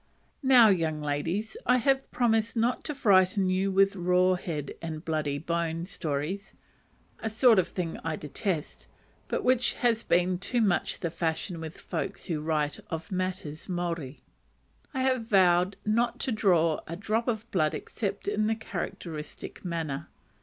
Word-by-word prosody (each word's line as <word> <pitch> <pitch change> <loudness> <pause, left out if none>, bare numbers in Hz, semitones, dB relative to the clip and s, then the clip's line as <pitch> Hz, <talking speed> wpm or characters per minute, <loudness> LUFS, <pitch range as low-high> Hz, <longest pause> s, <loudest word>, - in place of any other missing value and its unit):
Now, 255 -5 +7
young 165 -5 +1
ladies, 165 +9 -2
I 250 +1 +5
have 270 +2 +1
promised 225 -2 +1
not 235 +2 +1
to 300 - -2
frighten 190 -4 +4
you 190 +1 +1
with 195 +1 +4
raw 180 0 +3
head 155 -6 -4
and 160 -1 -5
bloody 155 -3 -1
bones 170 +2 -2
stories; 160 +5 -3 0.6
a 220 - -2
sort 225 -1 +5
of 180 - +1
thing 170 -3 -4
I 165 -1 -1
detest, 155 +2 -4 0.4
but - - -2
which 255 -1 +3
has 230 -2 +1
been 180 -2 +2
too 240 +6 -1
much 200 -6 +1
the 170 - -1
fashion 165 +1 -2
with 160 +2 -7
folks 195 - -4
who 160 -5 -2
write 150 -2 -1
of 160 +1 -5
matters 185 -5 -3
Maori. 170 -6 -3 0.7
I 260 -2 -1
have 255 -3 +1
vowed 185 -2 +4
not 230 +3 +1
to 260 - 0
draw 175 -7 +3
a 165 - -4
drop 215 +5 -1
of 225 -2 -1
blood 155 -5 +1
except - - -4
in 215 - +1
a 225 - +1
characteristic 160 -8 -6
manner. 165 -6 -3
185 Hz, 155 wpm, -28 LUFS, 160-220 Hz, 0.7 s, Now